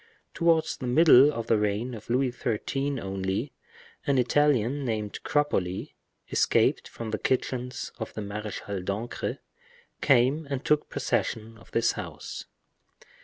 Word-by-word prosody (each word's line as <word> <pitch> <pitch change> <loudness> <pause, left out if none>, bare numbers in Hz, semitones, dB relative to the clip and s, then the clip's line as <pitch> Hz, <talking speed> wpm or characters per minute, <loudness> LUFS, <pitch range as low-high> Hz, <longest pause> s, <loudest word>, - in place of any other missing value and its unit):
Towards 165 -2 +2
the 125 - -5
middle 145 0 +7
of 115 -5 -4
the 115 -2 +3
reign 105 +4 -1
of 110 -1 -10
Louis 125 +1 +2
XIII. 135 +4 -2
only, 95 +6 -3 0.5
an 140 -1 +3
Italian 140 0 +2
named 110 -4 -3
Cropoli, 95 -11 0 0.4
escaped - - +2
from 115 -2 -6
the 110 - -2
kitchens 125 -1 -2
of 110 - -4
the 110 - -3
Marechal 100 -1 -5
d'Ancre, 105 +6 -3 0.6
came 135 +4 +3
and 140 -1 -3
took 150 0 +2
possession 115 +1 -2
of 110 - -18
this 115 - +2
house. - - -7
120 Hz, 130 wpm, -27 LUFS, 105-140 Hz, 0.6 s, middle